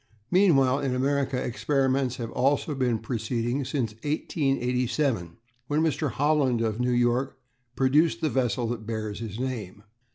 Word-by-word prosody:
Meanwhile 140 Hz, -9 st, +4 dB
in 135 Hz, -3 st, -1 dB
America 135 Hz, 0 st, 0 dB
experiments 130 Hz, 0 st, 0 dB
have 115 Hz, -2 st, -5 dB
also 140 Hz, +4 st, +1 dB
been 125 Hz, -4 st, +1 dB
proceeding 115 Hz, +3 st, -2 dB
since 125 Hz, -4 st, -2 dB
1887, 125 Hz, -, -1 dB, 0.3 s
when 150 Hz, +2 st, +1 dB
Mr. 155 Hz, -1 st, 0 dB
Holland 140 Hz, -3 st, +2 dB
of 110 Hz, 0 st, -1 dB
New 125 Hz, 0 st, +1 dB
York 120 Hz, +2 st, +1 dB, 0.4 s
produced 135 Hz, 0 st, +3 dB
the 155 Hz, -, 0 dB
vessel 125 Hz, -2 st, 0 dB
that 110 Hz, -3 st, -5 dB
bears 110 Hz, -2 st, -4 dB
his 110 Hz, -1 st, -6 dB
name. 110 Hz, -7 st, -4 dB
130 Hz, 135 wpm, -26 LUFS, 115-140 Hz, 0.4 s, Meanwhile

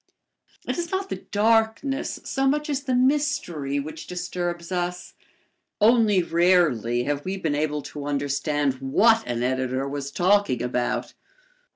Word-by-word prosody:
It -, -, -2 dB
is 340 Hz, -1 st, -3 dB
not 385 Hz, +1 st, -2 dB
the -, -, -3 dB
darkness 225 Hz, +5 st, 0 dB
so 270 Hz, 0 st, 0 dB
much 295 Hz, +2 st, 0 dB
as 280 Hz, -1 st, -1 dB
the 260 Hz, -2 st, -1 dB
mystery 250 Hz, -, 0 dB
which 155 Hz, +2 st, -7 dB
disturbs 175 Hz, -1 st, -4 dB
us. 180 Hz, 0 st, -3 dB, 0.7 s
Only 215 Hz, -4 st, +4 dB
rarely 165 Hz, -, +2 dB
have 145 Hz, +2 st, -2 dB
we 190 Hz, +1 st, -3 dB
been 160 Hz, -6 st, -1 dB
able 150 Hz, 0 st, -1 dB
to 145 Hz, -1 st, -7 dB
understand 145 Hz, -1 st, -1 dB
what 220 Hz, +12 st, +4 dB
an 120 Hz, 0 st, -2 dB
editor 130 Hz, +1 st, -1 dB
was 140 Hz, 0 st, -4 dB
talking 180 Hz, -, +2 dB
about. 125 Hz, 0 st, -2 dB
175 Hz, 140 wpm, -24 LUFS, 140-225 Hz, 0.7 s, Only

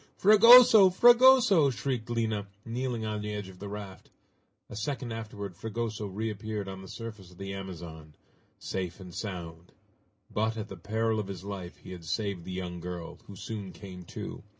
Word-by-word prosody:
"Fragoso! 215 Hz, 0 st, +9 dB
Fragoso!" 240 Hz, -, +6 dB
shrieked 120 Hz, -1 st, -3 dB
Lina, 110 Hz, -3 st, -1 dB, 0.2 s
kneeling 120 Hz, -1 st, -3 dB
on 105 Hz, -1 st, -3 dB
the 105 Hz, 0 st, -4 dB
edge 100 Hz, -2 st, -5 dB
of 90 Hz, -1 st, -14 dB
the 100 Hz, -, -7 dB
raft. 100 Hz, -2 st, -8 dB, 0.6 s
A -, -, -10 dB
second 120 Hz, +2 st, -3 dB
afterward 105 Hz, -4 st, -6 dB
Fragoso 110 Hz, +1 st, -4 dB
reappeared 105 Hz, 0 st, -4 dB
on 95 Hz, 0 st, -7 dB
the 95 Hz, -, -11 dB
surface 110 Hz, -4 st, -8 dB
of 90 Hz, -, -18 dB
the 95 Hz, 0 st, -6 dB
Amazon 85 Hz, -5 st, -8 dB, 0.4 s
safe 90 Hz, -1 st, -4 dB
and 90 Hz, -2 st, -10 dB
sound. 85 Hz, -4 st, -7 dB, 0.6 s
But, 110 Hz, +1 st, -1 dB
at 110 Hz, 0 st, -5 dB
the 95 Hz, -, -7 dB
peril 110 Hz, +4 st, -1 dB
of 105 Hz, -, -3 dB
his 95 Hz, -2 st, -7 dB
life 95 Hz, -3 st, -7 dB
he -, -, -12 dB
had 90 Hz, -2 st, -9 dB
saved 100 Hz, 0 st, -3 dB
the -, -, -6 dB
young 90 Hz, -1 st, -5 dB
girl, 85 Hz, -1 st, -7 dB
who 100 Hz, -, -10 dB
soon 100 Hz, -1 st, -6 dB
came 90 Hz, -3 st, -10 dB
to. -, -, -7 dB
105 Hz, 175 wpm, -29 LUFS, 95-115 Hz, 0.6 s, Fragoso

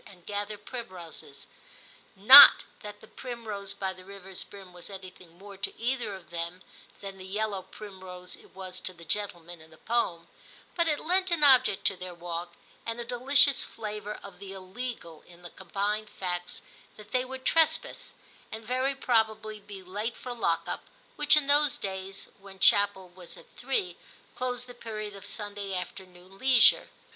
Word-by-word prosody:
and 180 Hz, -3 st, -17 dB
gather 205 Hz, +1 st, -4 dB
primroses; 180 Hz, -, -9 dB, 0.7 s
not 255 Hz, +9 st, +11 dB, 0.2 s
that 210 Hz, -1 st, -10 dB
the 220 Hz, -, -15 dB
* 215 Hz, -, -30 dB
primrose 215 Hz, -5 st, -5 dB
by 190 Hz, -1 st, -3 dB
the 185 Hz, 0 st, -14 dB
rivers 195 Hz, -1 st, -8 dB
brim* 190 Hz, -3 st, -14 dB
was 175 Hz, +1 st, -11 dB
anything 185 Hz, -3 st, -12 dB
more 200 Hz, +1 st, -12 dB
to 195 Hz, -, -3 dB
either 235 Hz, -4 st, -2 dB
of 170 Hz, -4 st, -15 dB
them 170 Hz, +2 st, -5 dB, 0.4 s
than 195 Hz, -1 st, -8 dB
the -, -, -9 dB
yellow 200 Hz, +1 st, -3 dB
primrose 185 Hz, -2 st, -11 dB
it -, -, -21 dB
was 185 Hz, -1 st, -8 dB
to 185 Hz, -, -5 dB
the 170 Hz, -1 st, -15 dB
gentleman 175 Hz, -3 st, -3 dB
in 160 Hz, -, -16 dB
the 160 Hz, -, -18 dB
poem, 175 Hz, -8 st, -2 dB, 0.5 s
but 340 Hz, -1 st, +1 dB
it 300 Hz, -2 st, 0 dB
lent 370 Hz, +3 st, +1 dB
an 340 Hz, -3 st, +1 dB
object 255 Hz, -7 st, +5 dB
to 195 Hz, -, +4 dB
their 180 Hz, -1 st, -8 dB
walk, 170 Hz, 0 st, -6 dB, 0.3 s
and 230 Hz, +1 st, -4 dB
a 235 Hz, -, -4 dB
delicious 260 Hz, +3 st, +4 dB
flavour 210 Hz, -1 st, -6 dB
of 195 Hz, -3 st, -12 dB
the 195 Hz, -1 st, -9 dB
illegal 190 Hz, -3 st, -8 dB
in 175 Hz, 0 st, -17 dB
the 175 Hz, -, -10 dB
combined 205 Hz, +3 st, -3 dB
facts 175 Hz, -1 st, -5 dB, 0.3 s
that 210 Hz, -1 st, -14 dB
they 255 Hz, 0 st, +1 dB
would 260 Hz, 0 st, -9 dB
trespass, 320 Hz, -1 st, +1 dB, 0.4 s
and 220 Hz, +1 st, -7 dB
very 255 Hz, +3 st, 0 dB
probably 220 Hz, -4 st, 0 dB
be 200 Hz, -2 st, -11 dB
late 210 Hz, +5 st, -5 dB
for 250 Hz, -, -7 dB
lock 170 Hz, -8 st, 0 dB
up, -, -, -4 dB, 0.3 s
which 295 Hz, +1 st, +4 dB
in 300 Hz, -, +3 dB
those 290 Hz, 0 st, +3 dB
days, 190 Hz, 0 st, -6 dB
when 195 Hz, -1 st, -13 dB
chapel 200 Hz, -1 st, +4 dB
was 175 Hz, -1 st, -11 dB
at -, -, -15 dB
three, 215 Hz, -9 st, -2 dB, 0.4 s
closed 250 Hz, 0 st, -4 dB
the 245 Hz, -, -12 dB
period 215 Hz, -3 st, -7 dB
of 200 Hz, 0 st, -9 dB
Sunday 205 Hz, -1 st, -4 dB
afternoon 185 Hz, +1 st, -8 dB
leisure. 260 Hz, -2 st, +5 dB
200 Hz, 170 wpm, -28 LUFS, 185-235 Hz, 0.7 s, not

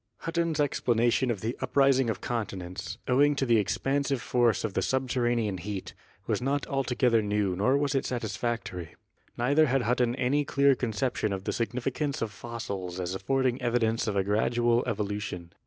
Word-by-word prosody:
Hutton's 165 Hz, -2 st, -1 dB
explanation 120 Hz, -3 st, +2 dB
of 110 Hz, -5 st, -2 dB
the 115 Hz, +2 st, -2 dB
uprising 135 Hz, -3 st, +3 dB
of 115 Hz, -, -3 dB
continents, 95 Hz, -5 st, -4 dB
owing 145 Hz, +3 st, +4 dB
to 135 Hz, -, 0 dB
the 115 Hz, -3 st, +4 dB
expansive 135 Hz, +6 st, 0 dB
force 120 Hz, -1 st, +2 dB
of 110 Hz, -3 st, -2 dB
the -, -, 0 dB
subterranean 120 Hz, -6 st, 0 dB
heat, 95 Hz, +1 st, -5 dB, 0.3 s
was -, -, -1 dB
not 140 Hz, +2 st, 0 dB
altogether 125 Hz, -4 st, +1 dB
new 105 Hz, -3 st, 0 dB
nor 125 Hz, +9 st, +2 dB
was 140 Hz, -1 st, 0 dB
it 135 Hz, -, 0 dB
satisfactory. 110 Hz, -7 st, -3 dB, 0.4 s
Neither 145 Hz, +6 st, +3 dB
had 135 Hz, -1 st, +1 dB
Hutton 120 Hz, +1 st, +1 dB
any 140 Hz, +3 st, +1 dB
clear 140 Hz, 0 st, +3 dB
conception 120 Hz, -2 st, -1 dB
of 95 Hz, -1 st, -3 dB
the -, -, -2 dB
significance 125 Hz, +4 st, -2 dB
of 110 Hz, -, -3 dB
fossils 100 Hz, -7 st, -6 dB
as 90 Hz, 0 st, -2 dB
affording 130 Hz, +5 st, 0 dB
evidence 115 Hz, -2 st, +1 dB
of 105 Hz, -, -1 dB
a 100 Hz, -, +2 dB
gradual 120 Hz, +4 st, +2 dB
evolution. 100 Hz, -5 st, -3 dB
120 Hz, 160 wpm, -28 LUFS, 105-135 Hz, 0.4 s, owing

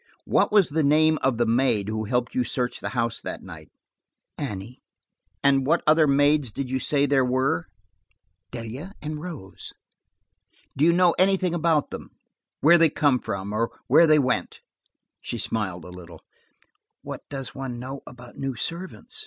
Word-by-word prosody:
What -, -, +2 dB
was 205 Hz, -4 st, +4 dB
the 160 Hz, +2 st, 0 dB
name 155 Hz, +2 st, +4 dB
of 130 Hz, -3 st, +1 dB
the 120 Hz, -, +2 dB
maid 115 Hz, -3 st, +1 dB
who 110 Hz, 0 st, -2 dB
helped 125 Hz, +2 st, -1 dB
you 125 Hz, -, +1 dB
search 125 Hz, 0 st, -2 dB
the -, -, -4 dB
house 115 Hz, 0 st, 0 dB
that -, -, -6 dB
night? -, -, -11 dB, 0.7 s
"Annie." 115 Hz, -3 st, -6 dB, 0.6 s
"What 140 Hz, +4 st, +3 dB
other 155 Hz, 0 st, +5 dB
maids 145 Hz, -2 st, +3 dB
did 135 Hz, +2 st, -5 dB
you 130 Hz, -, 0 dB
say 140 Hz, +2 st, +1 dB
there 140 Hz, -2 st, +3 dB
were?" 130 Hz, -8 st, 0 dB, 0.8 s
"Delia 125 Hz, -, -7 dB
and 150 Hz, 0 st, -5 dB
Rose." 155 Hz, -, -8 dB, 1.0 s
"Do 145 Hz, -, +2 dB
you 170 Hz, -, +6 dB
know 175 Hz, 0 st, +4 dB
anything 185 Hz, -2 st, +2 dB
about 165 Hz, -3 st, +1 dB
them? -, -, -8 dB, 0.5 s
Where 170 Hz, +4 st, +6 dB
they 165 Hz, -1 st, +5 dB
came 145 Hz, -3 st, +2 dB
from, 100 Hz, -1 st, -5 dB
or 115 Hz, +2 st, 0 dB, 0.2 s
where 170 Hz, -, +6 dB
they 155 Hz, 0 st, +6 dB
went?" 130 Hz, -3 st, -1 dB, 0.6 s
She -, -, -4 dB
smiled 95 Hz, -6 st, -3 dB
a -, -, -10 dB
little. 85 Hz, -3 st, -12 dB, 0.8 s
"What -, -, -7 dB
does 135 Hz, -2 st, -6 dB
one 130 Hz, -3 st, -5 dB
know 130 Hz, +3 st, -7 dB
about 125 Hz, -1 st, -12 dB
new 135 Hz, -2 st, -3 dB
servants?" 180 Hz, -, -3 dB
135 Hz, 160 wpm, -25 LUFS, 120-155 Hz, 1.0 s, you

